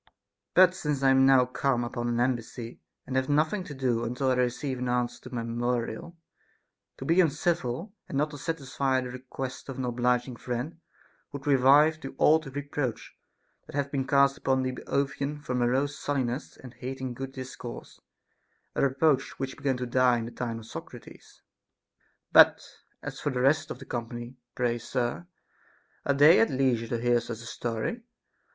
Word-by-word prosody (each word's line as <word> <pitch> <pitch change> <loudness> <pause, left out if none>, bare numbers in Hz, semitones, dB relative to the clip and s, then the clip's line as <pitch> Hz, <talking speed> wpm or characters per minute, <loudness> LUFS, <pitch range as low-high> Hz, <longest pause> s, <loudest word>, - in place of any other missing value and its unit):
But 185 0 +7
since 150 -6 -2
I 135 - +6
am 135 0 +5
now 130 -2 +6
come 125 -1 0
upon 120 0 -3
an 120 0 0
embassy, 120 -1 -2 0.3
and 130 - -5
have 130 +1 +1
nothing 155 +7 +2
to 145 - -8
do 125 -3 0
until 125 +3 0
I - - +4
receive 125 +1 -1
an 125 0 -2
answer 125 -1 -1
to 125 - -7
my 115 - -2
memorial, 120 +6 -2 0.8
to 135 - -7
be 165 +5 +5
uncivil 165 - -1 0.2
and 135 - -2
not 150 +1 +1
to 145 - -8
satisfy 135 -3 -1
the 125 -1 -6
request 130 +1 -7
of 135 - -5
an 130 - -2
obliging 125 0 0
friend 125 +8 -4 0.5
would 140 -1 -7
revive 145 +3 +5
the - - -7
old 155 0 +4
reproach 145 -4 -3 0.5
that - - -10
hath 140 -1 -1
been 135 -2 -1
cast 140 0 +4
upon 130 -1 +1
the 130 - -1
Boeotians 140 +3 -2
for 125 - -2
morose 130 +4 +1
sullenness 135 -1 -2
and 125 -2 -12
hating 130 0 -5
good 135 +2 -6
discourse, 130 -2 -8 0.7
a - - -1
reproach 140 0 +2
which 135 -1 -4
began 135 -3 -1
to 125 - -3
die 125 0 +3
in 115 - -3
the 115 - -7
time 115 -2 -4
of 115 - -10
Socrates. - - -11 0.4
' - - -44
But - - +8 0.4
as - - -6
for - - -1
the 125 -2 -1
rest 145 +3 +3
of - - -5
the 135 - -11
company, 120 +1 -5 0.2
pray 120 -1 0
sir, 120 +7 -2 0.8
are 140 - +4
they 150 +5 +7
at 225 - +4
leisure 130 -4 +1
to 115 0 -2
hear 120 0 +3
such 115 -1 -7
a - - -10
story 115 - -3
130 Hz, 180 wpm, -28 LUFS, 120-140 Hz, 0.8 s, But